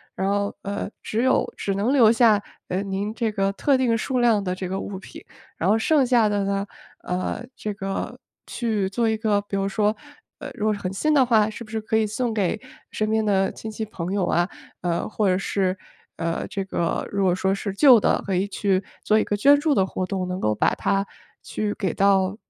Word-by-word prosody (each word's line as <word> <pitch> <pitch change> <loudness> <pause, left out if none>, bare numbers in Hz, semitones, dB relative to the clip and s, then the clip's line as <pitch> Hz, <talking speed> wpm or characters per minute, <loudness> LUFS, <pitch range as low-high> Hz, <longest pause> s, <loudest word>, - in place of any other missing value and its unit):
然 190 +1 -1
后， 200 0 -1
呃， 200 0 -4
只 225 +2 -1
有 260 0 +2
只 195 - -2
能 205 +6 +1
留 250 -6 +6
下， 225 -3 +4 0.3
呃， 185 +2 -1
您 200 +2 -3
这 230 -1 -1
个 195 -1 +1
特 270 +7 +2
定 240 -3 +2
数 255 +3 -1
量 230 -4 +3
的 185 -2 -2
这 185 -1 -5
个 190 +1 -2
物 195 -1 -5
品。 185 - -11 0.4
然 175 - 0
后 215 - +4
剩 275 +3 +3
下 235 -4 +4
的 205 -1 0
呢， 200 0 -1 0.4
呃， 185 +5 -3
这 210 - -4
个 195 0 -4 0.3
去 215 -5 -1
做 230 +3 0
一 220 - 0
个 215 -2 +1
比 205 0 -6
如 195 0 0
说 210 +1 +1 0.4
呃， 290 - -6
如 215 -3 -3
果 215 - +3
是 205 - -5
很 185 - -3
新 305 +11 +1
的 280 -3 +5
话， 220 -3 +4
是 220 +2 -8
不 215 - -15
是 220 - -1
可 220 0 -2
以 220 -1 +2
送 230 +2 -2
给 210 0 0 0.3
身 215 0 -1
边 220 0 +2
的 195 -2 +2
亲 220 - -8
戚 220 +1 -4
朋 180 -4 -5
友 200 -2 +1
啊， 175 +1 +1 0.3
呃， 170 -1 -1
或 215 -1 0
者 185 - +2
是， 190 -1 -1 0.4
呃， 165 0 -2
这 195 -1 -4
个 170 -3 -2
如 200 -1 0
果 180 -2 +3
说 190 +1 +1
是 200 +1 -3
旧 250 +1 +7
的， - - +1
可 195 - -2
以 185 +2 +1
去 200 -1 0 0.2
做 215 +1 +3
一 - - +2
个 205 - -2
捐 285 +6 +6
助 290 -1 +1
的 190 - +3
活 185 - -4
动， 185 -2 -2
能 180 +1 -3
够 105 0 +1
把 - - +2
它 195 0 0 0.4
去 210 -1 -3
给 190 -6 -2
到 195 -1 +3
205 Hz, 245 characters per minute, -23 LUFS, 195-220 Hz, 0.4 s, 旧